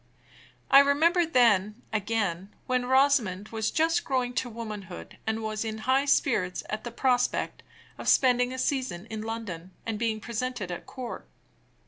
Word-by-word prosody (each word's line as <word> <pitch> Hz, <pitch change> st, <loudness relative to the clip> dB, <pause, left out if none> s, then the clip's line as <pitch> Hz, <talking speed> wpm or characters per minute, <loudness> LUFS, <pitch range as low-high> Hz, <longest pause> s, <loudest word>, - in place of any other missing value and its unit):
I 275 Hz, -, +10 dB
remember 320 Hz, +5 st, +4 dB
then, 215 Hz, -, +3 dB
again, 205 Hz, -4 st, -1 dB, 0.2 s
when 255 Hz, -1 st, 0 dB
Rosamond 255 Hz, -8 st, +2 dB
was 220 Hz, -1 st, -1 dB
just 330 Hz, +6 st, +1 dB
growing 255 Hz, -2 st, -1 dB
to 250 Hz, 0 st, -1 dB
womanhood, 210 Hz, -, -8 dB
and 220 Hz, 0 st, -1 dB
was 215 Hz, 0 st, -2 dB
in 220 Hz, -1 st, -4 dB
high 265 Hz, +2 st, +3 dB
spirits 220 Hz, -, +1 dB
at 215 Hz, 0 st, -3 dB
the 240 Hz, -, -4 dB
prospect 250 Hz, +1 st, 0 dB, 0.4 s
of -, -, -6 dB
spending 250 Hz, -1 st, +4 dB
a 260 Hz, -, -5 dB
season 255 Hz, -9 st, -1 dB
in 215 Hz, -1 st, -4 dB
London, 205 Hz, -6 st, -6 dB
and 220 Hz, -2 st, -3 dB
being 225 Hz, -2 st, 0 dB
presented 235 Hz, -2 st, -4 dB
at 175 Hz, -, -7 dB
court. 250 Hz, -3 st, -7 dB
230 Hz, 150 wpm, -27 LUFS, 210-260 Hz, 0.4 s, I